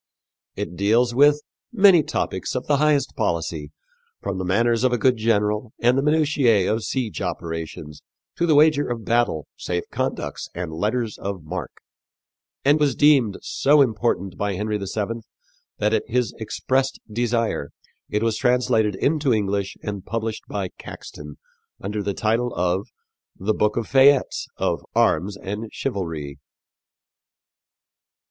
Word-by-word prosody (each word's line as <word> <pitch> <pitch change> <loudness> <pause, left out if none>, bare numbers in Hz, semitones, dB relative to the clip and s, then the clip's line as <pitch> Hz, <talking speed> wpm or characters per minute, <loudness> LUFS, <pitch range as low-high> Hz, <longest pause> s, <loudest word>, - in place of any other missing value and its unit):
It 90 - -5
deals 115 +6 +2
with 145 +3 +5 0.3
"many 195 -7 +6
topics 95 -8 -3
of 125 - -2
the 145 - +2
highest 150 -1 +2
policy, 85 - -2 0.5
from 100 -1 -4
the - - -2
manners 115 +6 +2
of 130 - +3
a 125 - +2
good 125 +3 +3
general 110 0 0
and 120 +1 +3
the 135 - +2
minutiæ 145 -9 +3
of 110 - -1
siege 120 -3 -3
operations 80 -4 -5 0.4
to 170 - +1
the 155 - +4
wager 150 -1 +4
of 115 -3 -4
battle, 115 - +1
safe 90 -1 -2
conducts - - -3
and 85 -2 -4
letters 110 +6 -2
of 95 -4 -5
marque," 75 - -6 0.9
and 145 +2 +5
was 145 -4 +2
deemed 135 -9 +4
so 145 +2 +3
important 110 -7 +1
by 100 -1 -1
Henry 105 +2 -2
VII 105 +4 -3 0.6
that - - +1
at - - 0
his 125 -2 0
expressed 130 +4 -1
desire 115 -8 -1 0.4
it 105 +1 0
was 115 -1 0
translated 125 -5 +2
into 145 +4 +1
English 100 -2 -1
and 100 -2 -4
published 115 0 -4
by 100 -3 -3
Caxton 75 -1 -9 0.4
under 105 +2 -3
the 100 -1 -2
title 115 +3 0
of 90 +2 0 0.5
The 105 +3 0
Boke 105 +1 +1
of 115 - 0
Fayettes 135 +1 +4
of - - -1
Armes 100 +6 +2
and 105 +3 -6
Chyvalrye. 80 - -4
110 Hz, 140 wpm, -23 LUFS, 100-130 Hz, 0.9 s, many